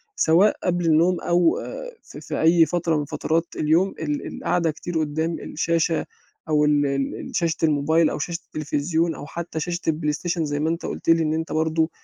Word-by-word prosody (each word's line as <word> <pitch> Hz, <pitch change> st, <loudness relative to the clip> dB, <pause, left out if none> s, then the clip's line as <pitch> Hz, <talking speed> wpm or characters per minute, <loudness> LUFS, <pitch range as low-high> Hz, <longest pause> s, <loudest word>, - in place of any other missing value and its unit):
سواء 175 Hz, +6 st, +4 dB
قبل 175 Hz, -1 st, 0 dB
النوم 165 Hz, +3 st, +3 dB
أو 175 Hz, -1 st, +3 dB
آآ -, -, -7 dB
في -, -, -11 dB
في -, -, -4 dB
أي 165 Hz, +1 st, +6 dB
فترة 165 Hz, 0 st, 0 dB
من 150 Hz, -, -2 dB
فترات 160 Hz, +2 st, -1 dB
اليوم 165 Hz, +6 st, +2 dB
ال 150 Hz, -2 st, -3 dB
القعدة 170 Hz, -2 st, 0 dB
كتير 165 Hz, +2 st, -4 dB
قُدّام 160 Hz, +2 st, -1 dB
الشاشة، 165 Hz, 0 st, 0 dB, 0.4 s
أو 150 Hz, -1 st, +3 dB
ال 145 Hz, -1 st, +3 dB
ال 140 Hz, -1 st, -1 dB
ال -, -, -8 dB
شاشة 165 Hz, -2 st, 0 dB
الموبايل 155 Hz, +1 st, +3 dB
أو -, -, -4 dB
شاشة 170 Hz, +2 st, -3 dB
التلفزيون، 155 Hz, +2 st, -1 dB
أو 145 Hz, -, -8 dB
حتّى 165 Hz, +2 st, -5 dB
شاشة 175 Hz, +2 st, -2 dB
الPlayStation 160 Hz, +2 st, -2 dB
زي 145 Hz, -1 st, -2 dB
ما 155 Hz, +2 st, 0 dB
أنت 165 Hz, +1 st, -3 dB
قُلت -, -, -4 dB
لي 165 Hz, 0 st, +5 dB
إن 155 Hz, 0 st, 0 dB
أنت 160 Hz, +1 st, -3 dB
برضه 160 Hz, +1 st, +1 dB
160 Hz, 190 wpm, -23 LUFS, 150-170 Hz, 0.4 s, أي